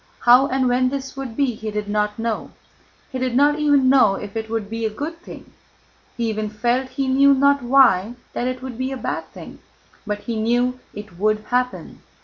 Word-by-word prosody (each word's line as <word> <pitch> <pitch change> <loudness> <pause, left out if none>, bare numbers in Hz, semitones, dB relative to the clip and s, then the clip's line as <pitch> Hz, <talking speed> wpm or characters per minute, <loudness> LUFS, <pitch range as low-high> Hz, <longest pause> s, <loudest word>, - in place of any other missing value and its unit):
How 250 +3 +6
and 260 -1 0
when 250 +1 +2
this 270 0 -5
would 265 -4 -7
be 275 -4 +1
he 220 0 -6
did 210 0 -4
not 210 0 -1
know, 225 -1 -3 0.6
he 260 - -4
did 255 -1 -1
not 290 +3 +3
even 290 -3 +3
know 255 -7 +5
if 205 +1 -8
it 220 0 -4
would 225 -2 -3
be 225 +2 -5
a 220 - +1
good 300 +10 -6
thing 355 - -12 0.6
(he 235 -1 -1
even 215 -1 -2
felt, 240 +5 -1
he 270 +1 -3
knew 275 +1 +5
not 280 +1 +3
why, 240 -4 +4 0.2
that 245 - -2
it 255 0 -4
would 255 -2 -7
be 260 +1 -2
a 265 - -4
bad - - -4
thing), - - -11 0.5
but 210 0 -3
he 230 0 -4
knew 245 +3 0 0.2
it 205 -4 -10
would 215 +1 +1
happen. 250 0 -2
245 Hz, 205 wpm, -21 LUFS, 215-265 Hz, 0.6 s, How